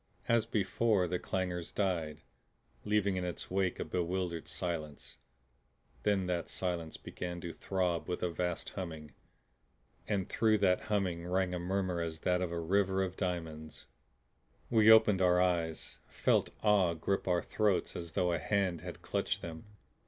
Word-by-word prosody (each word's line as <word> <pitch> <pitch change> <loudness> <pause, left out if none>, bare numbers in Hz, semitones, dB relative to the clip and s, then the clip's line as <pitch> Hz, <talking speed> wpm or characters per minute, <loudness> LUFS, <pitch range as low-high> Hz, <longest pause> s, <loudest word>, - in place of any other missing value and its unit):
As 115 -1 +3
before, 105 -2 +2
the 90 +1 -1
clangor 90 -2 -2
died, 85 -4 -2 0.6
leaving 105 -2 +1
in 90 - -1
its 90 0 -5
wake 95 -1 0
a - - -2
bewildered 90 -1 -2
silence. 80 -4 -5 0.8
Then 100 -3 +2
that 90 -2 -2
silence 85 -3 -3
began 90 -1 -6
to 85 -1 -5
throb 90 -3 -1
with 90 - -2
a 90 - +1
vast 90 0 -2
humming, 80 -5 -6 0.9
and 100 -3 0
through 110 -1 +3
that 95 -3 +2
humming 90 -5 0
rang 90 0 +1
a 90 - -2
murmur 90 -1 -1
as 80 -1 -4
that 90 0 +1
of 90 -2 -1
a 85 - -2
river 95 +2 +2
of 95 -1 -4
diamonds. 80 -5 -4 0.9
We 110 -2 +6
opened 110 -3 +7
our 90 -1 +5
eyes, 85 -3 0
felt - - +2
awe 100 -5 +4
grip 95 +5 -1
our 90 -2 +2
throats 105 -4 +1
as 85 -1 -6
though 90 +1 +2
a 85 - 0
hand 95 -4 0
had - - -8
clutched - - -1
them. 80 +1 -7
90 Hz, 155 wpm, -33 LUFS, 85-95 Hz, 0.9 s, opened